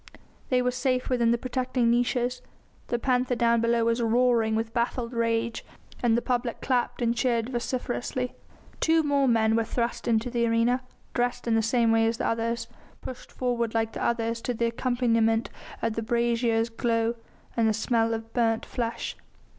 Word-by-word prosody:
They 250 -1 +2
were 250 - +1
safe 255 0 -1
within 240 -2 +3
the 235 - +3
protecting 255 -1 0
niches; 245 +1 0 0.5
the 240 - 0
panther 250 0 +1
down 235 -1 +3
below 230 0 +2
was 230 +1 +1
roaring 230 -1 +3
with 225 0 -2
baffled 240 0 -1
rage, 230 0 0 0.4
and 235 -2 +3
the 240 - -1
public 245 -2 -1
clapped 245 -1 0
and 235 0 +1
cheered 235 -1 0
vociferously. 250 0 -3 0.5
Two 320 0 +3
more 285 -2 +2
men 225 -2 +3
were 230 - +2
thrust 235 +1 -2
into 230 +1 +1
the 235 -1 +1
arena, 230 +2 +2 0.3
dressed 245 0 -1
in 230 - +2
the 225 - +3
same 230 +1 +2
way 225 0 +4
as 225 0 -1
the - - -2
others, 230 +1 -1 0.3
pushed 255 - -8
forward 235 -3 -1
like 225 0 0
the - - -4
others 230 0 0
to 245 - -2
the 235 - 0
accompaniment 230 -1 +1 0.3
of 230 -1 0
a 225 - -1
brazier's 235 0 +1
glow 230 0 0 0.4
and 230 -1 +3
the - - +3
smell 225 +1 +1
of 225 0 -8
burnt 225 -2 +1
flesh. 230 -1 -3
235 Hz, 175 wpm, -27 LUFS, 230-245 Hz, 0.5 s, way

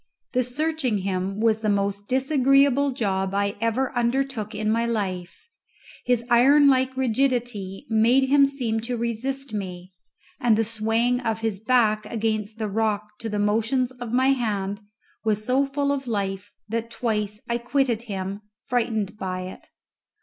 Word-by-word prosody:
The 255 0 +2
searching 275 -2 -1
him 195 +1 -2
was 220 -1 +2
the 215 - 0
most 200 0 -1
disagreeable 275 +1 +3
job 195 -6 -1
I 200 0 0
ever 245 +3 0
undertook 240 -2 -1
in 215 0 0
my 230 +1 +1
life. 190 - -3 0.6
His 245 -1 +1
iron 270 +5 +6
like 260 -1 +2
rigidity 245 -6 -1
made 230 +4 +4
him 280 0 +5
seem 245 -5 -2
to 240 +2 -3
resist 235 +3 -3
me, 185 -2 -6 0.5
and 230 -3 +3
the 225 - +3
swaying 225 +3 +1
of 225 -3 -2
his 220 -4 -1
back 220 -2 +2
against 215 -1 -2
the 220 -1 -2
rock 210 0 -1
to 225 - -4
the 210 - -2
motions 225 +5 +1
of 245 -3 -7
my 260 +2 +3
hand 205 -6 -1 0.4
was 215 -1 0
so 260 +3 +2
full 280 +1 -1
of 275 -2 -2
life 200 -3 -3 0.2
that 230 +1 -3
twice 210 -3 -2
I 235 0 0
quitted 245 -2 0
him, 195 +1 -4 0.2
frightened 220 -4 -2
by 185 -1 -3
it. 185 +1 -9
225 Hz, 155 wpm, -24 LUFS, 210-255 Hz, 0.6 s, iron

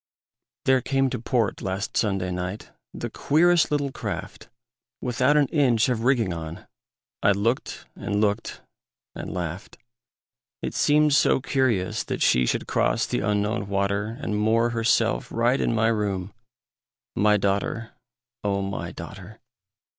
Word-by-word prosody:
There 130 -1 +4
came 135 +1 +1
to 125 - -3
port 115 -2 0
last 95 +1 -3
Sunday 95 -4 0
night 90 +3 -5 0.2
The - - -6
queerest 170 +3 +3
little 145 -2 0
craft, - - -6 0.5
Without 130 +4 +2
an 145 - +5
inch 125 -7 +3
of 115 -3 -1
rigging 120 -8 +2
on; 80 0 -7 0.6
I 100 - +4
looked 115 +6 -2
and 100 +1 -2
looked 105 +1 -1 0.5
and - - -6
laughed. 90 +2 -5 0.9
It - - -3
seemed 150 0 +3
so 140 - +4
curious 130 -9 0
that - - -2
she 60 0 +3
Should - - 0
cross 115 - +1
the 125 - -1
Unknown 105 0 0
water, 100 +3 -1
And 110 -7 -3
moor 115 +3 +2
herself 115 - +1
right 120 +3 +2
in 115 - +1
my 110 0 +3
room, 100 -3 -2 0.8
My 105 0 +4
daughter, 100 +4 -1 0.5
O 100 -1 0
my 95 0 -4
daughter! 100 +3 -10
110 Hz, 140 wpm, -25 LUFS, 100-125 Hz, 0.9 s, an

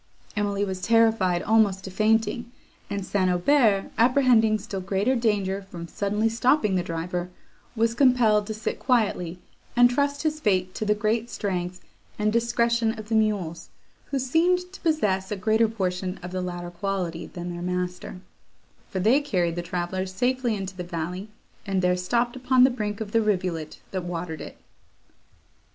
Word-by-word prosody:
Emily 205 -1 0
was 190 -1 -4
terrified 220 -5 +3
almost 205 -3 +3
to 190 - -7
fainting; 225 +4 +1 0.4
and 200 -2 -3
St. 190 -2 +1
Aubert, 200 +2 +3
apprehending 235 -3 +4
still 200 -2 -6
greater 195 +7 +1
danger 205 -5 0
from 170 -2 -7
suddenly 210 +4 0
stopping 230 -1 +2
the 185 - +2
driver, 175 +1 -3 0.5
was 230 0 +2
compelled 235 -5 +4
to 220 - -3
sit 215 - -3
quietly, 205 -9 0 0.4
and 245 0 +6
trust 285 +3 0
his 310 -1 0
fate 185 -7 +1
to 215 - -3
the 215 +2 +1
strength 180 -5 -3 0.4
and 210 0 +1
discretion 235 -1 +1
of 215 0 -9
the 225 - +1
mules, 205 -7 0 0.4
who 280 - -2
seemed 355 +8 +1
to - - -11
possess 210 - 0
a - - 0
greater 220 +3 +2
portion 185 -3 -3
of 180 - -6
the 185 0 -2
latter 175 -1 -5
quality 180 -2 -3
than 175 -1 -6
their 175 - -6
master; 180 0 -4 0.7
for 190 - -3
they 230 +10 +4
carried 180 - 0
the 175 - -2
travellers 180 +2 -3
safely 245 +3 0
into 195 -1 -5
the 180 - -5
valley, 175 +3 -5 0.4
and 190 -2 0
there 180 0 +3
stopped 235 +7 0
upon 255 0 +4
the 260 - +6
brink 210 -3 -3
of 210 -2 -5
the 230 - +3
rivulet 180 -7 -1
that 185 -2 -3
watered 170 -2 -5
it. - - -9
205 Hz, 165 wpm, -25 LUFS, 180-230 Hz, 0.7 s, and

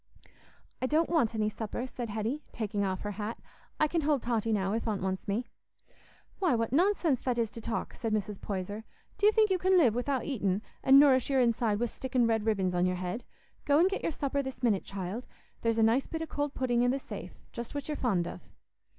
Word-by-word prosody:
"I 255 - +1
don't 315 +4 +2
want 245 -10 +2
any 215 -1 +1
supper," 220 +3 -4
said 245 -2 -6
Hetty, 220 +7 -2
taking 205 -3 -2
off 190 -1 -1
her 205 - -3
hat. 210 +2 -4 0.4
"I 305 - +4
can 330 +2 0
hold 290 -3 +1
Totty 230 -2 0
now, 195 -2 +1
if 230 +1 -2
Aunt 205 -4 -1
wants 190 +1 -2
me." 210 +5 -1 0.9
"Why, 360 -9 +3
what 230 +1 -1
nonsense 340 - +3
that 250 -2 -1
is 230 -2 0
to 230 - -8
talk!" 230 +1 -3
said 225 -3 -3
Mrs. 210 -1 -2
Poyser. 205 +2 -4 0.4
"Do 410 - +5
you - - +7
think 435 -2 +3
you 370 - +2
can 375 +1 +4
live 260 -11 +5
wi'out 250 +1 -1
eatin', 205 -7 -1 0.2
an' 270 +1 +8
nourish 275 -3 +6
your 270 -1 +3
inside 230 -3 +2
wi' 240 - +2
stickin' 250 +1 0
red 225 -1 +1
ribbons 190 -4 +1
on 180 +1 +2
your 180 - 0
head? 180 +6 -4 0.4
Go 285 0 +3
an' 345 +4 +6
get 395 - -2
your - - -1
supper 280 -1 -1
this 265 -1 -7
minute, 215 -6 +2
child; 195 +5 -5 0.3
there's 230 -1 +1
a 225 - +4
nice 230 +5 +3
bit 320 0 -3
o' - - -2
cold 290 -2 -3
pudding 245 -2 +1
i' - - +3
the 260 +2 +2
safe—just 240 -2 -8
what 285 -1 -3
you're 300 - -2
fond 195 -11 0
of." - - -7
235 Hz, 225 wpm, -30 LUFS, 210-280 Hz, 0.9 s, an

